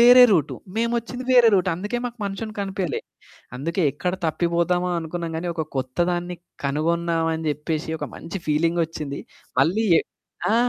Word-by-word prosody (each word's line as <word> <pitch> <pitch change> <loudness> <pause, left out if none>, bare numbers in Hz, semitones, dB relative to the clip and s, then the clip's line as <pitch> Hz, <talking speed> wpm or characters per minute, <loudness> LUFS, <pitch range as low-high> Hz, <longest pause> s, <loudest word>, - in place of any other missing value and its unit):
వేరే 245 +1 +10
రూటు, 165 -8 +2 0.2
మేమొచ్చింది 235 +2 -1
వేరే 240 -2 +8
రూటు. 185 -1 +3
అందుకే 205 +7 -3
మాకు 240 -1 -5
మనుషులు 200 +2 -4
కనిపియలే. 190 -6 -2 0.6
అందుకే 165 +7 -1
ఎక్కడ 180 0 -2
తప్పిపోదామా 170 +2 +1
అనుకున్నాం 165 0 -4
గాని, 175 +2 -3
ఒక 160 - -1
కొత్త 130 +3 -3
దాన్ని 175 0 -2 0.3
కనుగొన్నామని 165 +3 +1
అని 160 0 -5
జెప్పేసి 150 +2 -2
ఒక - - -3
మంచి 180 +4 -6
ఫీలింగొచ్చింది. 160 -2 0 0.4
మళ్ళీ 215 +7 +3
ఎ - - +4 0.5
ఆ! 220 - +4
175 Hz, 145 wpm, -24 LUFS, 160-200 Hz, 0.6 s, వేరే